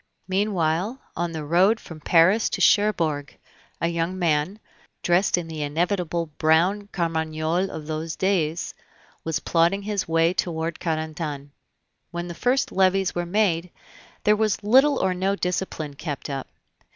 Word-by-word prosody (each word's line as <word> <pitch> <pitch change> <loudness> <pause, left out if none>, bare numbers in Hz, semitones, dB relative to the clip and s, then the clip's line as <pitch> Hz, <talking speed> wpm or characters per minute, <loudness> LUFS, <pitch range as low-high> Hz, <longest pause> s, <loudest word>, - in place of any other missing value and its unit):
Meanwhile, 190 +2 0 0.2
on 170 0 -2
the 160 -2 -5
road 185 +8 +3
from 165 -2 -11
Paris 175 +8 +4
to - - -3
Cherbourg, 165 -9 +2 0.4
a 170 - +1
young 170 +2 -2
man, 170 +2 +1 0.5
dressed 175 +2 +3
in 175 -2 -3
the 160 -2 -6
inevitable 170 +2 -1
brown 175 +6 +3
carmagnole 165 0 -1
of 155 -4 -7
those 160 +1 -4
days, 175 -4 0 0.5
was 160 -1 -1
plodding 175 +4 +2
his 205 -2 -2
way 165 +1 +3
toward 165 -2 -2
Carentan. 155 -3 -3 0.6
When 175 0 -5
the 170 - -5
first 250 +9 +1
levies 190 0 +2
were 175 0 -2
made, 180 -3 +1 0.5
there 210 - +5
was 215 -1 0
little 265 +7 +5
or 190 -1 +1
no 190 +2 0
discipline 180 -5 -3
kept 145 -1 -5
up. 135 -1 -4
170 Hz, 140 wpm, -24 LUFS, 160-195 Hz, 0.6 s, there